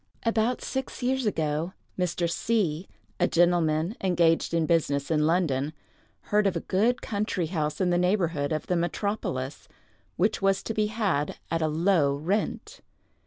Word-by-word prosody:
About 230 +1 +1
six 265 -1 -4
years 260 -1 +1
ago, 160 -1 -1 0.2
Mr. 180 -1 0
C——, 180 -3 -1 0.3
a 175 - +4
gentleman 170 +1 +2
engaged 170 -3 +2
in 165 -1 +1
business 150 -3 +1
in 150 -1 +3
London, 155 -4 +1 0.5
heard 210 -1 +2
of 195 - 0
a - - 0
good 230 +7 +1
country 205 -4 -1
house 155 -3 -2
in 180 -2 +2
the 175 - +2
neighborhood 175 -6 +1
of 155 - -2
the 180 - 0
metropolis, 170 -6 -2 0.5
which 200 +3 +1
was 195 0 +2
to 225 - -3
be 215 -1 +1
had 205 -10 -1
at 165 0 0
a 160 - +2
low 155 -2 +2
rent. 180 +9 -2
175 Hz, 155 wpm, -27 LUFS, 155-205 Hz, 0.5 s, a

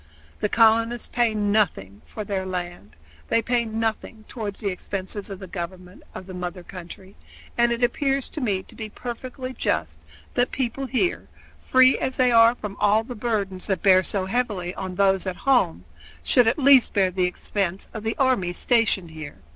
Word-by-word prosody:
The 210 - 0
colonists 230 +1 +3
pay 235 -2 +1
nothing 205 - 0
for 215 - -6
their 195 -2 -2
land; 175 - -6 0.3
they - - +2
pay 240 +1 0
nothing 220 0 -3
toward 210 -4 -5
the 205 - -2
expenses 195 +2 -4
of 195 - -6
the 190 - -9
government 180 0 -7
of 185 - -7
the 185 - -9
mother 180 0 -5
country; 185 +2 -11 0.4
and 235 0 +3
it 235 +1 -1
appears 270 +2 +1
to 305 - -6
me 200 -6 0
to - - -17
be 220 -1 -7
perfectly 255 +3 -6
just 80 - -2 0.3
that 245 - +1
people 265 +1 -2
here, 270 +9 0 0.3
free 260 0 +5
as 260 0 -2
they 255 -1 +4
are 230 0 +6
from 210 -4 -7
all 210 +2 +3
the 245 - -7
burdens 210 -5 -2
that 195 -3 -1
bear 185 -2 +6
so 190 +1 -2
heavily 190 -5 -2
on 185 -1 -6
those 195 0 +2
at 185 - -2
home, 90 - +2 0.4
should 240 - +4
at 225 - +2
least 275 -3 +5
bear 190 -3 +2
the 180 0 +1
expense 185 +1 -3
of 220 - -5
the 225 +1 -3
army 250 -10 +1
stationed 215 -6 +1
here. 155 -2 -9
210 Hz, 180 wpm, -24 LUFS, 185-240 Hz, 0.4 s, are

